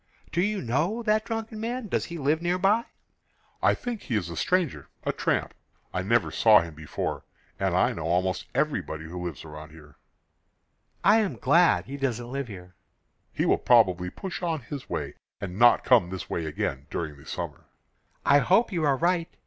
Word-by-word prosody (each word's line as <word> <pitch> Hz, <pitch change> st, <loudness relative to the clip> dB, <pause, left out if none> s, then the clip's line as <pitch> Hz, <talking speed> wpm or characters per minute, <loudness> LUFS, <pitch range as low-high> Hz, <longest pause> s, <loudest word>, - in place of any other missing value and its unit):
"Do 170 Hz, -, +1 dB
you 205 Hz, -1 st, 0 dB
know 160 Hz, -, 0 dB
that 215 Hz, 0 st, +2 dB
drunken 225 Hz, -1 st, -4 dB
man? 235 Hz, +1 st, -3 dB
Does -, -, -1 dB
he 170 Hz, -, -7 dB
live 150 Hz, +2 st, +1 dB
nearby?" 195 Hz, +6 st, +2 dB, 0.8 s
"I -, -, +4 dB
think 240 Hz, -3 st, -5 dB
he 120 Hz, -, -3 dB
is 90 Hz, -5 st, -1 dB
a -, -, -6 dB
stranger 180 Hz, -, 0 dB
a -, -, 0 dB
tramp. -, -, -1 dB, 0.4 s
I 90 Hz, -, -1 dB
never 115 Hz, +6 st, +1 dB
saw 110 Hz, -2 st, +6 dB
him 85 Hz, -1 st, -7 dB
before, 75 Hz, 0 st, -4 dB, 0.4 s
and -, -, +1 dB
I -, -, +3 dB
know 80 Hz, -, -5 dB
almost 90 Hz, +1 st, 0 dB
everybody 80 Hz, 0 st, -1 dB
who 90 Hz, +2 st, -6 dB
lives 85 Hz, -3 st, -6 dB
about 75 Hz, 0 st, -9 dB
here." 75 Hz, -2 st, -16 dB, 1.1 s
"I 210 Hz, +5 st, +6 dB
am 200 Hz, -, 0 dB
glad 165 Hz, +9 st, +4 dB
he 140 Hz, +2 st, -6 dB
doesn't 120 Hz, -3 st, -2 dB
live 135 Hz, -1 st, -3 dB
here." 90 Hz, -4 st, -10 dB, 0.6 s
"He -, -, -1 dB
will -, -, +3 dB
probably 95 Hz, -7 st, +4 dB
push 185 Hz, -, -6 dB
on 165 Hz, -4 st, -1 dB
his 145 Hz, -3 st, -8 dB
way -, -, -3 dB, 0.3 s
and 95 Hz, 0 st, -6 dB
not 120 Hz, 0 st, +6 dB
come 115 Hz, -9 st, +4 dB
this 95 Hz, 0 st, -6 dB
way 80 Hz, -2 st, -3 dB
again 70 Hz, -2 st, -3 dB
during 80 Hz, -3 st, -4 dB
the 70 Hz, -, -16 dB
summer." -, -, -5 dB, 0.6 s
"I 140 Hz, 0 st, +6 dB
hope 195 Hz, +10 st, +3 dB
you 170 Hz, -4 st, -1 dB
are 140 Hz, -3 st, +3 dB
right. 170 Hz, +2 st, +1 dB
130 Hz, 185 wpm, -27 LUFS, -, 1.1 s, saw